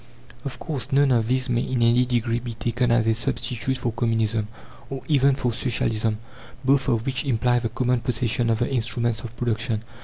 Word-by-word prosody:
Of 140 - -5
course, 145 -5 -5
none 140 0 +4
of 115 -3 +2
these 130 +1 +1
may, 120 -2 +1
in 125 -2 0
any 120 +2 +4
degree, 120 -1 0
be 120 -1 -6
taken 120 +2 0
as 115 -1 +3
a 115 - +3
substitute 120 +2 -2
for 120 -2 -2
Communism, 115 -2 0 0.4
or 135 -1 -5
even 140 -2 +4
for 125 -3 -1
Socialism, 110 -2 0 0.5
both 135 -1 +3
of 115 -1 +1
which 135 -1 -1
imply 120 -2 +2
the 115 -1 -2
common 125 +1 0
possession 120 0 0
of 115 - +2
the 120 - 0
instruments 120 -2 0
of 115 0 -9
production. 115 -2 -1
120 Hz, 190 wpm, -24 LUFS, 115-130 Hz, 0.5 s, none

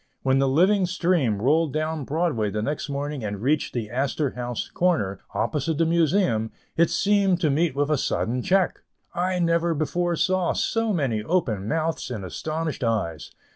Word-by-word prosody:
When 135 0 +3
the 135 0 +2
living 185 +7 +3
stream 165 - +1
rolled 155 +2 +2
down 155 -1 -2
Broadway 150 -9 0
the 105 +2 -2
next 145 +3 -3
morning 140 -1 -3
and 100 -1 -3
reached 140 +7 0
the 110 -3 -3
Astor 135 +2 -1
House 120 -1 -4
corner, 105 - 0 0.2
opposite 150 +1 -1
the 165 - +3
Museum, 165 - +2 0.3
it 170 0 +3
seemed 200 -3 +2
to 155 -4 +2
meet 155 0 +1
with 145 +2 0
a 150 - +2
sudden 125 0 -1
check. 190 +5 +1 0.3
I 180 +1 0
never 170 -1 +1
before 175 +3 0
saw 185 +1 +1
so 225 -1 0
many 135 - 0
open 110 - -1
mouths 160 +1 -1
and 110 -6 -5
astonished 155 - -3
eyes. 105 -9 -1
150 Hz, 170 wpm, -24 LUFS, 125-170 Hz, 0.3 s, When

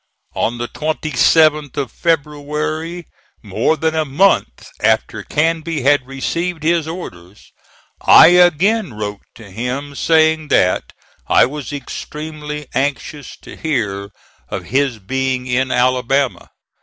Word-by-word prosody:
On 120 - -1
the 120 0 -3
27th 155 -1 +1
of 135 -5 -2
February, 155 +2 -2 0.4
more 160 - 0
than 160 +1 0
a 160 0 +1
month 145 - +1
after - - +1
Canby 160 -1 -1
had 140 -2 +3
received 165 +5 -3
his 165 -1 +1
orders, 100 - -9 0.5
I - - +8
again 180 - +3
wrote 105 -1 -5
to 105 -4 -13
him, 125 +7 -4
saying 160 +1 +2
that 90 -9 +1 0.4
I - - +5
was 145 +1 -6
extremely 150 +1 -7
anxious 140 +2 -3
to - - -11
hear 105 -10 -2 0.4
of - - -4
his 135 -1 0
being 130 +5 -2
in 130 +1 0
Alabama. 130 +2 0
145 Hz, 120 wpm, -17 LUFS, 125-160 Hz, 0.5 s, I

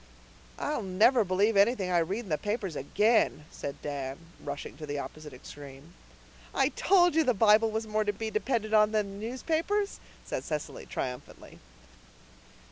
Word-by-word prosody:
"I'll 295 -4 -2
never 215 +6 +4
believe 200 +3 +2
anything 200 -2 +3
I 175 - +4
read 190 +7 -1
in 210 - -11
the 155 - +1
papers 205 -5 -3
again," 205 - +2
said 140 - -6
Dan, 140 -2 -4 0.3
rushing 145 0 -6
to 155 - -8
the 145 0 -3
opposite 150 +1 -7
extreme. 140 +4 -12 0.6
"I - - +3
told 355 -3 +4
you 320 +1 +4
the 250 -5 +2
Bible 220 +2 +5
was 220 +1 -2
more 215 0 0
to 205 - 0
be 220 +2 -5
depended 215 0 -1
on 210 0 +5
than 200 -2 -1
the 215 - -5
newspapers," 330 - -1 0.3
said - - -3
Cecily 150 -2 -5
triumphantly. 125 -1 -6
205 Hz, 160 wpm, -29 LUFS, 155-225 Hz, 0.6 s, Bible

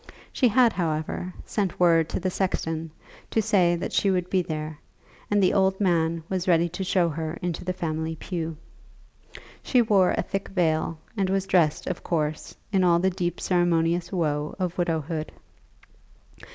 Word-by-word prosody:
She 255 - +3
had, 240 0 +4
however, 160 +1 -2
sent 195 -5 -2
word 165 -2 +4
to - - -2
the 185 - -1
sexton 165 -4 -2 0.4
to - - +1
say 195 -5 +3
that 170 - -4
she 200 - +2
would 180 -1 0
be 185 - +3
there, 155 -2 -5 0.5
and 205 -1 +3
the 185 - +4
old 190 -1 +2
man 165 -4 +1
was 185 -1 -2
ready 170 -1 +4
to 180 +3 -4
show 185 -2 +2
her 160 +1 -4
into 175 -3 -3
the 185 - -1
family 160 -3 -3
pew. 165 -1 -4 1.0
She 255 - +2
wore 200 -4 +3
a - - +1
thick 195 0 -4
veil, 165 -3 0 0.2
and 195 -3 0
was 195 0 0
dressed, 165 -6 +2
of 185 - -3
course, 155 -2 -2 0.2
in 190 -2 +3
all 175 -1 +5
the 190 +2 +2
deep 175 -2 -2
ceremonious 175 -1 +1
woe 150 -5 -1
of 180 -2 -2
widowhood. 160 -2 -2
175 Hz, 165 wpm, -25 LUFS, 160-190 Hz, 1.0 s, all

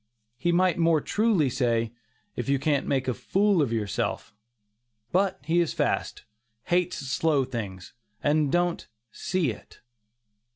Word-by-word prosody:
He 175 - +1
might 180 0 +2
more 165 -1 +4
truly 205 -3 +2
say, 115 -3 0 0.4
"if 120 +1 -4
you 140 - +3
can't 140 +1 0
make 130 -2 0
a 125 - +1
fool 195 - +2
of 135 -6 0
yourself"; 105 -2 -2 0.8
but 190 +2 +1
he 165 +4 +2
is 170 -2 0
"fast," - - -1 0.4
hates 180 +3 +1
slow 140 +1 +1
things, 100 -8 -6 0.3
and 150 -1 +2
don't 175 0 0 0.2
"see 180 -9 -1
it." 105 - -13
150 Hz, 135 wpm, -26 LUFS, 125-175 Hz, 0.8 s, more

